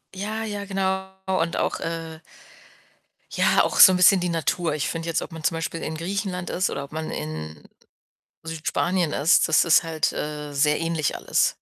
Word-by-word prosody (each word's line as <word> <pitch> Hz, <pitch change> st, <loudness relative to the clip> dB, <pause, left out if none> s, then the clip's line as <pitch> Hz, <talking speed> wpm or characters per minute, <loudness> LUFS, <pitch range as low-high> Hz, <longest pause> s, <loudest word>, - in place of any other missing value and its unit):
Ja, 215 Hz, +3 st, -4 dB
ja, 205 Hz, -2 st, -5 dB
genau, 190 Hz, -1 st, -2 dB, 0.2 s
und 170 Hz, -3 st, 0 dB
auch, -, -, -1 dB
äh 165 Hz, -1 st, -5 dB, 1.1 s
ja, -, -, +3 dB
auch -, -, -1 dB
so 190 Hz, -, +11 dB
'n 185 Hz, -, +1 dB
bisschen 185 Hz, 0 st, +6 dB
die 180 Hz, -, -1 dB
Natur. 165 Hz, 0 st, -1 dB
Ich 150 Hz, -, -2 dB
finde 165 Hz, 0 st, -5 dB
jetzt, 165 Hz, -, 0 dB
ob -, -, -8 dB
man 160 Hz, -1 st, -9 dB
zum 165 Hz, +1 st, +1 dB
Beispiel 165 Hz, 0 st, -4 dB
in 160 Hz, -, -4 dB
Griechenland 180 Hz, +1 st, -4 dB
ist 180 Hz, +1 st, 0 dB
oder 140 Hz, -, -4 dB
ob -, -, -19 dB
man 160 Hz, 0 st, -4 dB
in 80 Hz, 0 st, -6 dB, 0.8 s
Südspanien 165 Hz, +1 st, -1 dB
ist, 155 Hz, +5 st, +3 dB
das 160 Hz, -, +4 dB
ist 170 Hz, +1 st, +5 dB
halt, 160 Hz, -2 st, -1 dB
äh, 150 Hz, -1 st, -5 dB
sehr 150 Hz, +2 st, +2 dB
ähnlich 165 Hz, -3 st, -1 dB
alles. -, -, +1 dB
165 Hz, 185 wpm, -24 LUFS, 155-185 Hz, 1.1 s, so